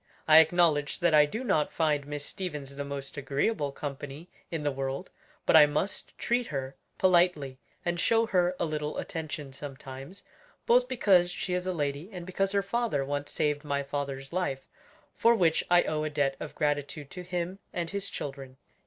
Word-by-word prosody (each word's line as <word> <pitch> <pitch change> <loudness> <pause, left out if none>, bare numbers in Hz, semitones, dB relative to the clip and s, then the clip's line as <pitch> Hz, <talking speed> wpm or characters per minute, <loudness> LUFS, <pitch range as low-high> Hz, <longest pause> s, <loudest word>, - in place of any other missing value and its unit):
I 155 0 +9
acknowledge 160 -3 +3
that 170 -2 +2
I 150 -1 +7
do 220 - -4
not 155 -11 +1
find 150 -3 +1
Miss 145 -1 -4
Stevens 150 -7 -5
the 140 - -3
most 140 0 -6
agreeable 140 +4 0
company 145 +3 -7 0.2
in 165 -3 -3
the 145 - +1
world, 135 +5 -4 0.3
but - - +4
I 150 -2 +9
must 150 +7 -3
treat 240 +1 0
her 135 -2 -4 0.2
politely, 175 -8 +3 0.3
and 175 0 0
show 230 +4 +3
her 180 -4 +2
a - - +1
little 150 -1 -3
attention 150 -4 -5
sometimes; 135 +4 -8 0.4
both - - +4
because 190 - +4
she 180 +1 -3
is 180 0 -1
a - - +1
lady 145 +1 -2
and 180 -3 -7
because 195 +1 0
her 200 0 +1
father 200 - 0
once 145 +1 -3
saved 150 -1 0
my 140 -1 -1
father's 140 0 -4
life; 155 -8 -2 0.5
for 235 +1 +4
which 170 -6 +3
I 175 0 +6
owe 155 -1 -1
a 155 - -1
debt 140 -2 0
of - - -7
gratitude 145 0 -2
to 180 - -6
him 180 +1 -3
and 170 -2 -3
his 200 0 -2
children." 135 -2 -6
150 Hz, 180 wpm, -29 LUFS, 140-180 Hz, 0.5 s, I